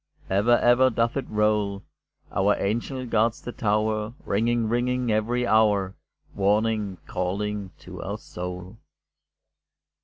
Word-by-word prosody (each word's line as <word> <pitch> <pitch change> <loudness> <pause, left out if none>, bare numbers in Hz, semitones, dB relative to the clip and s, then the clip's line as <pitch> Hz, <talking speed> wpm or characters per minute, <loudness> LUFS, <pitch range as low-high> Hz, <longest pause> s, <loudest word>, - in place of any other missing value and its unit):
Ever, 110 +5 +4
ever, 125 +2 +5
doth 115 0 0
it 135 - -3
roll, 105 -2 +1 0.5
Our 100 +2 +2
angel 120 +6 -2
guards 115 0 +1
the 120 - -7
tower, 110 +1 0
Ringing, 115 +2 +1
ringing, 120 +1 0
every 120 +3 +1
hour, 105 -4 +3 0.4
Warning, 105 -1 +1
calling 100 +2 -3
to - - -9
our - - -4
soul. 90 +3 -7
110 Hz, 115 wpm, -25 LUFS, 100-120 Hz, 0.5 s, ever